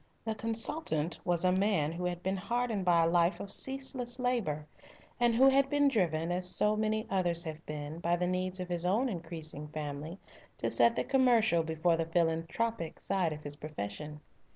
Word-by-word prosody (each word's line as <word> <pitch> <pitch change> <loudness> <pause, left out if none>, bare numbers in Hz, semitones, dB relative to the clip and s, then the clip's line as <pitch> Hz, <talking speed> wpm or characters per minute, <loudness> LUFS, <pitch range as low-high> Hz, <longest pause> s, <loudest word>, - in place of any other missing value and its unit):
The 220 - -1
consultant 220 - -1
was 175 0 +1
a 180 - +5
man 185 -5 +2
who 175 +2 -4
had 175 -1 -3
been 190 +1 0
hardened 230 +1 -1
by 170 -2 +5
a - - +3
life 170 +2 +2
of 200 - -6
ceaseless 265 -1 -1
labour, 235 - -1 0.5
and 240 -1 +3
who 265 +3 +6
had 270 0 +4
been 290 0 +3
driven, 170 - 0
as 180 0 -1
so 210 +3 +2
many 215 0 0
others 175 -3 0
have 160 -1 -7
been, 150 +1 -5
by 170 0 +1
the 180 +1 -1
needs 185 +1 -1
of 180 - -4
his 175 -1 -1
own 215 +9 +2
increasing 160 -5 -5
family 150 +2 -5 0.4
to - - -1
set 235 - +4
the - - 0
commercial 240 -9 +3
before 160 +1 +1
the 165 0 -1
philanthropic 165 +3 -1
side 185 -4 0
of 150 0 -7
his 145 0 -4
profession. 150 +1 -6
180 Hz, 185 wpm, -31 LUFS, 160-220 Hz, 0.5 s, who